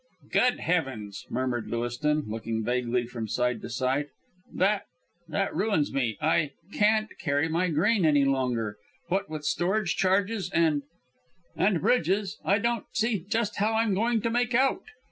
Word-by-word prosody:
"Good 250 Hz, 0 st, +2 dB
heavens," 130 Hz, -, -2 dB
murmured 125 Hz, -2 st, -2 dB
Lewiston, 120 Hz, +6 st, -1 dB
looking 110 Hz, +1 st, -3 dB
vaguely 120 Hz, +1 st, 0 dB
from 120 Hz, -2 st, -5 dB
side 125 Hz, +1 st, 0 dB
to -, -, -7 dB
side. 130 Hz, +4 st, 0 dB, 0.4 s
"That 200 Hz, +2 st, +1 dB, 0.4 s
that 165 Hz, +5 st, -1 dB
ruins 200 Hz, -8 st, +1 dB
me. 120 Hz, -5 st, 0 dB
I 155 Hz, -1 st, +1 dB, 0.2 s
can't 215 Hz, +1 st, +2 dB
carry 145 Hz, 0 st, +1 dB
my 170 Hz, +3 st, +1 dB
grain 190 Hz, +6 st, +2 dB
any 145 Hz, -3 st, +4 dB
longer 125 Hz, -6 st, 0 dB, 0.3 s
what 190 Hz, -2 st, 0 dB
with 155 Hz, -1 st, -5 dB
storage 180 Hz, +4 st, +1 dB
charges 195 Hz, +1 st, +1 dB
and 160 Hz, -5 st, +2 dB, 0.7 s
and 190 Hz, -5 st, +2 dB
Bridges, 200 Hz, -1 st, +1 dB
I 200 Hz, -, +3 dB
don't 235 Hz, +1 st, -1 dB
see 220 Hz, -1 st, +1 dB
just 225 Hz, -2 st, 0 dB
how 215 Hz, +2 st, +1 dB
I'm 225 Hz, -2 st, +2 dB
going 225 Hz, +3 st, +1 dB
to 230 Hz, -, -1 dB
make 245 Hz, +1 st, +1 dB
out. 270 Hz, +8 st, +2 dB
165 Hz, 150 wpm, -27 LUFS, 130-210 Hz, 0.7 s, any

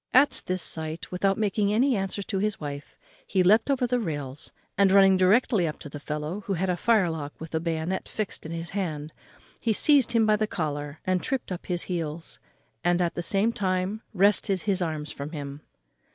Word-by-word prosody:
At 275 Hz, +3 st, +5 dB
this 185 Hz, -2 st, +1 dB
sight, 160 Hz, 0 st, +1 dB
without 195 Hz, +2 st, +1 dB
making 205 Hz, -1 st, +1 dB
any 250 Hz, +4 st, +3 dB
answer 195 Hz, 0 st, -2 dB
to 195 Hz, -1 st, -2 dB
his 210 Hz, +1 st, -1 dB
wife, 145 Hz, -1 st, -7 dB, 0.3 s
he 185 Hz, -2 st, +2 dB
leapt 215 Hz, +8 st, +4 dB
over 265 Hz, -3 st, +2 dB
the 245 Hz, 0 st, +1 dB
rails, 145 Hz, -, -4 dB, 0.2 s
and, 195 Hz, -1 st, +4 dB
running 195 Hz, -1 st, +7 dB
directly 190 Hz, 0 st, +3 dB
up 150 Hz, -, -4 dB
to 145 Hz, -, -9 dB
the 145 Hz, -, -7 dB
fellow, 150 Hz, +6 st, -4 dB
who 200 Hz, -, 0 dB
had 185 Hz, +1 st, 0 dB
a -, -, 0 dB
firelock 170 Hz, -8 st, +1 dB
with 160 Hz, +1 st, -9 dB
a 160 Hz, -, +1 dB
bayonet 165 Hz, +2 st, -2 dB
fixed 215 Hz, -3 st, -4 dB
in 160 Hz, -, -7 dB
his 165 Hz, 0 st, -5 dB
hand, 160 Hz, -6 st, -3 dB, 0.5 s
he 225 Hz, -, +1 dB
seized 265 Hz, 0 st, +4 dB
him 230 Hz, -1 st, +4 dB
by 215 Hz, -1 st, +4 dB
the 215 Hz, 0 st, 0 dB
collar 145 Hz, -5 st, -3 dB
and 185 Hz, -1 st, +1 dB
tript 265 Hz, -7 st, -2 dB
up 180 Hz, -, -5 dB
his 175 Hz, -2 st, -2 dB
heels, 165 Hz, -2 st, -4 dB, 0.4 s
and, 175 Hz, 0 st, +2 dB
at 175 Hz, -1 st, +1 dB
the -, -, -3 dB
same 200 Hz, +6 st, +1 dB
time, 190 Hz, +1 st, -1 dB
wrested 195 Hz, -1 st, +2 dB
his 195 Hz, -3 st, 0 dB
arms 155 Hz, -3 st, -3 dB
from 145 Hz, +3 st, -7 dB
him. 140 Hz, -1 st, -6 dB
185 Hz, 200 wpm, -26 LUFS, 160-210 Hz, 0.5 s, running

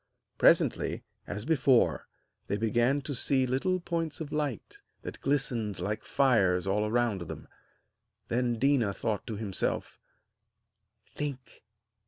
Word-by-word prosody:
Presently, -, -, +3 dB, 0.2 s
as 105 Hz, +1 st, -4 dB
before, 135 Hz, -5 st, +3 dB, 0.4 s
they 100 Hz, -, -1 dB
began 120 Hz, +6 st, +2 dB
to 140 Hz, +1 st, -5 dB
see 130 Hz, +1 st, +1 dB
little 135 Hz, +9 st, 0 dB
points 165 Hz, -3 st, -3 dB
of 155 Hz, -2 st, -6 dB
light 145 Hz, -6 st, -3 dB, 0.2 s
that -, -, -8 dB
glistened 120 Hz, -8 st, 0 dB
like 105 Hz, +4 st, -2 dB
fires 100 Hz, -10 st, +2 dB
all 105 Hz, +2 st, +1 dB
around 115 Hz, -3 st, +1 dB
them. 85 Hz, -, -8 dB, 0.8 s
Then 120 Hz, -1 st, 0 dB
Déna 125 Hz, -7 st, +2 dB
thought 110 Hz, -3 st, -2 dB
to 110 Hz, -, -4 dB
himself: 100 Hz, -3 st, -3 dB, 1.1 s
'Think! 140 Hz, -4 st, -6 dB
120 Hz, 120 wpm, -29 LUFS, 105-140 Hz, 1.1 s, Presently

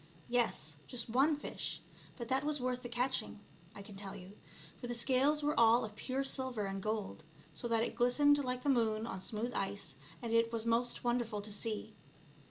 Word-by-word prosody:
Yes; 230 Hz, -11 st, 0 dB
just 240 Hz, -2 st, -5 dB
one 275 Hz, +6 st, +4 dB
fish, 290 Hz, -, -4 dB, 0.4 s
but 235 Hz, -2 st, -5 dB
that 265 Hz, +2 st, +1 dB
was 300 Hz, 0 st, 0 dB
worth 250 Hz, 0 st, -1 dB
the 245 Hz, -, -6 dB
catching, 245 Hz, -2 st, -1 dB, 0.4 s
I 200 Hz, -, -7 dB
can 205 Hz, 0 st, -10 dB
tell 195 Hz, 0 st, -6 dB
you, 185 Hz, +1 st, -10 dB, 0.5 s
for 245 Hz, -, -5 dB
the 240 Hz, -, -2 dB
scales 270 Hz, +5 st, +3 dB
were 295 Hz, +1 st, +2 dB
all 230 Hz, +1 st, +6 dB
of 210 Hz, -1 st, -9 dB
pure 260 Hz, +4 st, -1 dB
silver 260 Hz, -5 st, -1 dB
and 195 Hz, 0 st, -3 dB
gold, 210 Hz, -5 st, -2 dB, 0.3 s
so 150 Hz, +10 st, -3 dB
that 230 Hz, -1 st, +3 dB
it -, -, 0 dB
glistened 285 Hz, +5 st, +4 dB
like 250 Hz, -1 st, -2 dB
the 285 Hz, -, +1 dB
moon 225 Hz, -4 st, +2 dB
on 190 Hz, -5 st, -5 dB
smooth 225 Hz, +5 st, -2 dB
ice, 195 Hz, -3 st, -2 dB, 0.2 s
and 230 Hz, -2 st, -3 dB
it 230 Hz, 0 st, +4 dB
was 230 Hz, -1 st, 0 dB
most 235 Hz, +1 st, +1 dB
wonderful 240 Hz, -3 st, 0 dB
to 210 Hz, -, -6 dB
see. 210 Hz, +1 st, -3 dB
235 Hz, 195 wpm, -35 LUFS, 215-255 Hz, 0.5 s, all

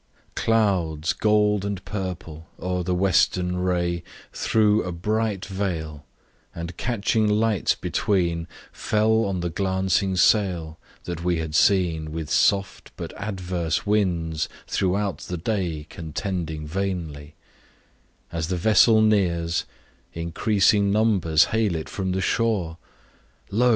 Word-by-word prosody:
CLOUDS, 90 Hz, -8 st, +1 dB
gold 105 Hz, -1 st, +2 dB
and 100 Hz, -2 st, -4 dB
purple, 85 Hz, -5 st, -6 dB
o'er 90 Hz, +1 st, -2 dB
the 90 Hz, +1 st, -1 dB
western 90 Hz, -1 st, +2 dB
ray 90 Hz, -1 st, 0 dB, 0.3 s
Threw 110 Hz, -1 st, +2 dB
a 90 Hz, -, -4 dB
bright 105 Hz, +3 st, -1 dB
veil, 80 Hz, -7 st, -4 dB, 0.5 s
and 85 Hz, +1 st, -6 dB
catching 110 Hz, -1 st, 0 dB
lights 105 Hz, -2 st, +2 dB
between, 85 Hz, -4 st, 0 dB, 0.2 s
Fell 110 Hz, +1 st, +1 dB
on 95 Hz, -3 st, -2 dB
the 85 Hz, -1 st, -2 dB
glancing 95 Hz, +1 st, 0 dB
sail, 90 Hz, -5 st, +2 dB, 0.2 s
that 85 Hz, -1 st, -5 dB
we 90 Hz, -1 st, +1 dB
had 80 Hz, -1 st, -4 dB
seen 80 Hz, -4 st, +2 dB
With 80 Hz, -2 st, -5 dB
soft, 100 Hz, -1 st, +1 dB
but -, -, -6 dB
adverse 90 Hz, -6 st, -2 dB
winds, 85 Hz, -7 st, 0 dB, 0.2 s
throughout 95 Hz, -3 st, -1 dB
the 90 Hz, -, -5 dB
day 85 Hz, -5 st, -2 dB
Contending 80 Hz, -1 st, -4 dB
vainly: 80 Hz, -4 st, -4 dB, 1.0 s
as 80 Hz, -2 st, -2 dB
the 90 Hz, 0 st, -1 dB
vessel 110 Hz, +3 st, +5 dB
nears, 85 Hz, -6 st, +1 dB, 0.5 s
Increasing 100 Hz, +4 st, +2 dB
numbers 100 Hz, -7 st, +3 dB
hail 110 Hz, -5 st, +1 dB
it 80 Hz, -, -4 dB
from 95 Hz, -2 st, -3 dB
the 95 Hz, +1 st, -1 dB
shore; 95 Hz, -8 st, 0 dB, 0.7 s
Lo! 120 Hz, +5 st, +3 dB
90 Hz, 120 wpm, -24 LUFS, 85-105 Hz, 1.0 s, vessel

